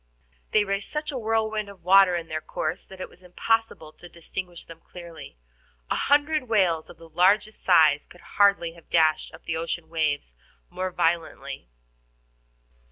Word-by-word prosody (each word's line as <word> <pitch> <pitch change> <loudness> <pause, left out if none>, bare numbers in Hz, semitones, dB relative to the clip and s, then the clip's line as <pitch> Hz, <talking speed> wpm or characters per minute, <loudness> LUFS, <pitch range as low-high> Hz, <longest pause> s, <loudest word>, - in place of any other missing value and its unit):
They 215 - +3
raised 200 0 -3
such 300 0 -3
a 270 - -4
whirlwind 220 -2 -1
of 195 -4 -14
water 190 0 +6
in 170 -1 -4
their 155 0 -4
course 155 +4 -4
that 190 - -13
it - - -5
was 180 - -21
impossible 180 -3 -1
to 175 - -14
distinguish 175 +1 -7
them 165 -1 -12
clearly. 170 - -11 0.5
A - - +2
hundred 290 -2 +1
whales 180 -7 +2
of - - -13
the 165 - -14
largest 190 +6 +2
size 155 -5 +4
could 175 - -17 0.2
hardly 200 -5 +4
have 170 -1 -19
dashed 155 -2 +2
up - - -14
the 160 - -3
ocean 165 0 -4
waves 150 - -1 0.4
more 185 0 -3
violently. 170 - -2
180 Hz, 165 wpm, -25 LUFS, 165-205 Hz, 0.5 s, water